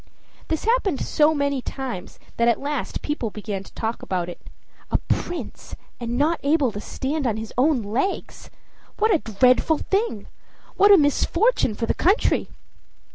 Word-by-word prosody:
This 320 - -2
happened 440 - +2
so 310 +1 +3
many 280 -2 0
times 250 -9 -6 0.2
that 235 - +3
at 235 - +3
last 285 -1 -3
people 295 -6 -2
began 205 -2 -5
to 195 - -14
talk 225 +1 -3
about 180 -2 -2
it. 175 - -9 0.5
A - - +2
prince, 350 0 -4 0.2
and 240 0 -3
not 315 +4 +2
able 285 -3 +2
to 205 0 -6
stand 280 +3 -2
on 220 -2 0
his 220 0 -7
own 260 -1 +2
legs! 240 - -3 0.5
What 435 0 +3
a 335 - +3
dreadful 255 +7 +3
thing! 390 - -1 0.5
What 405 +1 +6
a 400 - +9
misfortune 320 - +2
for 230 - -2
the - - +1
country! 390 +7 +2
275 Hz, 160 wpm, -23 LUFS, 225-320 Hz, 0.5 s, a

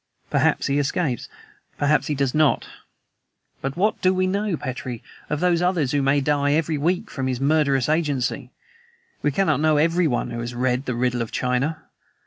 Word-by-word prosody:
Perhaps - - +2
he 140 +1 +1
escapes; 140 -3 -1 0.5
perhaps 150 +1 +2
he 150 - -1
does 135 -2 0
not. 155 -2 +2 0.9
But 135 +3 -4
what 210 +4 +1
do 185 0 +3
we 185 0 +2
know, 200 -1 -1
Petrie, 130 -4 -5 0.3
of 150 0 -2
those 175 -1 +2
others 175 -7 +1
who 145 - +1
may 140 +1 +2
die 145 0 +1
every 160 0 +1
week 170 +5 -1
by - - -3
his 130 -2 -1
murderous 140 -2 +2
agency? 145 -5 -1 0.7
We 150 - +2
cannot 155 -3 +1
know 155 0 +3
EVERYONE 165 -3 +1
who 120 - -4
has 120 +1 -5
read 125 +2 0
the 125 - -1
riddle 125 0 0
of 115 - -4
China. 135 +6 -1
145 Hz, 175 wpm, -23 LUFS, 130-160 Hz, 0.9 s, do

